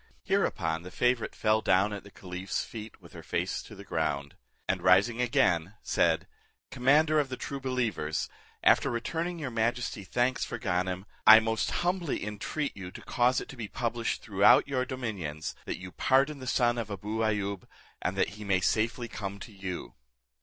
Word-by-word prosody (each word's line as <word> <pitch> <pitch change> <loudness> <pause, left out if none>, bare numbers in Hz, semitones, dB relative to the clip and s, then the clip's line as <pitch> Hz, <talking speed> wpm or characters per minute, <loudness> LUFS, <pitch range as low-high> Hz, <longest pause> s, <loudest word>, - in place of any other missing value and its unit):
Hereupon 80 0 0
the 90 - -9
favourite 125 +3 0
fell 110 0 +2
down 100 +2 +3
at 100 - -6
the 100 - -13
caliph's 90 0 -4
feet, 110 -1 -9
with - - -15
her - - -9
face - - -2
to - - -12
the - - -10
ground; 70 0 -2 0.3
and 95 -1 0
rising 100 +7 +4
again, 95 -6 +2
said, - - +2 0.5
"Commander 150 +5 +4
of 145 -3 0
the 130 - -4
true 140 - -5
believers, 110 - -1 0.4
after - - +5
returning 165 +9 -2
your 145 -6 -4
majesty 115 -2 -1
thanks 125 +6 0
for - - -4
Ganem, 90 -2 -1 0.2
I 110 +1 +12
most 110 0 0 0.2
humbly 175 - -1
entreat 105 +8 -3
you 95 -3 -7
to - - -10
cause 125 +1 +2
it - - -7
to - - -9
be 115 -4 -5
published 115 +1 -2
throughout 100 +3 +5
your 130 -2 0
do 130 0 -5
minions, 85 - -4
that - - -2
you 90 0 -9
pardon 140 +6 +2
the 130 - -8
son 120 -2 +2
of 110 -2 -4
Abou 105 +3 -4
Ayoub, 100 -3 -1 0.3
and 95 +2 -2
that - - +2
he 105 +1 -9
may 100 -2 +2
safely 115 +6 0
come 100 -3 -5
to 110 - -10
you." 95 -3 -6
110 Hz, 180 wpm, -29 LUFS, 95-125 Hz, 0.5 s, I